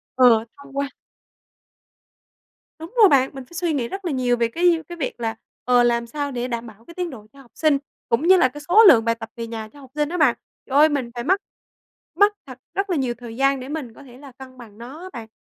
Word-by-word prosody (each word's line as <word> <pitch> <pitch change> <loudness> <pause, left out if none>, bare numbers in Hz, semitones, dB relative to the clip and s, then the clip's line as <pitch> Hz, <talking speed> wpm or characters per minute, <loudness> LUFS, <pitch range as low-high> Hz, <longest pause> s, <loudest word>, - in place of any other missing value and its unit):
ờ, 235 -3 +5
thông 280 0 -12
qua 280 0 -1 1.9
Đúng 325 +8 -9
rồi 410 -4 +8
bạn, 265 -2 +4
mình 265 -2 -9
phải 345 - -20
suy 340 -1 -1
nghĩ 250 -5 -1
rất 390 +4 -7
là 335 - -1
nhiều 250 -2 +1
về 235 - +2
cái, 340 +8 +3
ơ, 325 - -9
cái 345 - -7
việc 265 -5 -4
là, 225 -1 -2 0.3
ờ, 245 0 +4
làm 235 0 +1
sao 285 +2 -4
để 245 -1 -3
đảm 235 -1 -4
bảo 220 +1 -15
cái 340 - -13
tiến 360 -1 -3
độ 215 -6 -11
cho 275 - -15
học 245 - -21
sinh, 305 -3 +3 0.3
cũng 250 +9 +1
như 375 0 +7
là 260 - +5
cái 295 +3 -10
số 435 +5 +7
lượng 230 -9 +7
bài 230 0 +2
tập 225 0 -9
về 230 -1 -5
nhà 225 -1 -6
cho 290 - -17
học 265 -2 -15
sinh 300 0 0
đó 360 - -3
bạn. 285 -7 +4 0.3
Trời 275 - -1
ơi, 310 +1 +7
mình 260 -5 -2
phải 240 - -4
mất 380 +8 +2 0.7
mất 410 +1 +4
thật 255 -2 -11
rất 395 0 -2
là 350 - 0
nhiều 255 -3 -1
thời 235 -2 -9
gian 275 0 +2
để 255 +2 -8
mình 285 -7 -5
có 285 - -15
thể 250 -2 -15
là 275 -1 -13
cân 255 0 -13
bằng 220 -4 -14
nó 260 +8 -10
á 370 - -8
bạn. 230 -3 -8
265 Hz, 265 wpm, -22 LUFS, 235-315 Hz, 1.9 s, rồi